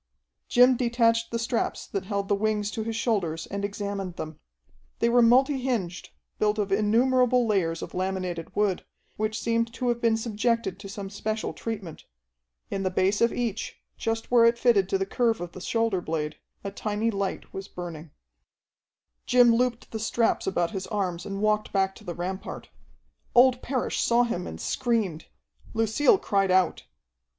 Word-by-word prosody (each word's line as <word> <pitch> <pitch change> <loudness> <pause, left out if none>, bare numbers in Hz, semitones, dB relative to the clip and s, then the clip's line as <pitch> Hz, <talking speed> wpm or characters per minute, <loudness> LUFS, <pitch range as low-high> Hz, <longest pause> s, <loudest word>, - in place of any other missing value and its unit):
Jim 250 +1 +6
detached 230 -1 +2
the 230 - -2
straps 230 +1 -2
that 195 -2 -4
held 200 -1 -2
the 205 - +2
wings 210 0 0
to 220 - -3
his 225 0 -3
shoulders 180 -9 -1
and 200 0 -5
examined 200 -2 -4
them. 155 -2 -7 0.6
They 235 - +2
were 245 +1 +5
multi 260 +4 +4
hinged, 205 -9 -2 0.3
built 210 0 +2
of 205 -2 -1
innumerable 245 +4 +3
layers 175 -6 0
of - - -8
laminated 185 -2 -3
wood, 205 -3 +1 0.3
which 215 +1 -1
seemed 230 0 0
to 250 0 -1
have 235 0 -1
been 230 -1 +3
subjected 225 -3 -1
to 200 -1 -9
some 195 -1 -6
special 215 +2 -3
treatment. 205 -8 -6 0.7
In 195 - -2
the 190 - 0
base 190 +2 +1
of 235 - +4
each, 230 -3 -3 0.2
just 225 0 -3
where 240 -1 +6
it 230 0 +5
fitted 210 -6 +3
to 195 - +2
the 195 - -1
curve 230 +2 +1
of 175 -1 -6
the 185 - -10
shoulder 225 -3 0
blade, 155 -2 -3 0.3
a 200 - -4
tiny 210 +2 -1
light 200 -2 -3
was 195 0 -6
burning. 170 -4 -8 1.2
Jim 245 -1 +6
looped 240 0 0
the 220 - -4
straps 225 0 +1
about 175 -3 0
his 190 -3 -4
arms 180 -4 -2
and 195 +1 -4
walked 215 0 +1
back 195 -1 +1
to 215 - -15
the 175 -4 -5
rampart. 185 +2 -5 0.7
Old 250 0 +6
Parrish 255 -1 -2
saw 240 +1 +4
him 180 -7 -2
and - - -7
screamed. 220 -10 -1 0.5
Lucille 225 - +4
cried 195 - +1
out. 185 0 +2
210 Hz, 170 wpm, -26 LUFS, 190-230 Hz, 1.2 s, Jim